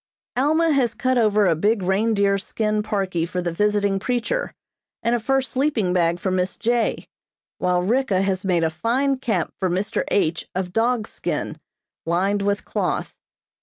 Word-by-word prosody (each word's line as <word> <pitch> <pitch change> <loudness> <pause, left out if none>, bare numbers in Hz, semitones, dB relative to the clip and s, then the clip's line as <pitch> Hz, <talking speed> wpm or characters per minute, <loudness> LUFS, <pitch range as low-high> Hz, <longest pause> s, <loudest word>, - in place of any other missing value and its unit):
Alma 315 +5 +3
has 250 -6 +2
cut 255 +1 +1
over 210 -2 +3
a 170 -3 +3
big 205 +5 +1
reindeer 200 +1 +2
skin 215 +2 -1
parkie 195 -6 -1
for 180 - -2
the 175 -1 -1
visiting 205 +1 +1
preacher, 250 - -1 0.5
and 235 +1 +2
a 240 - +2
fur 270 +4 +1
sleeping 260 -8 0
bag 170 -1 +2
for 190 - -1
Miss 185 0 0
J., 235 0 0 0.5
while 180 -1 +1
Ricka 210 -2 +1
has 190 -1 -1
made 180 -3 +1
a 160 - +1
fine 260 - 0
cap 210 -10 -1
for 185 - 0
Mr. 190 +4 -1
H. 170 -4 0
of 180 -1 -3
dog's 230 0 +1
skin, - - -3 0.5
lined 195 +4 +1
with 200 0 -1
cloth. - - -2
205 Hz, 165 wpm, -22 LUFS, 185-240 Hz, 0.5 s, Alma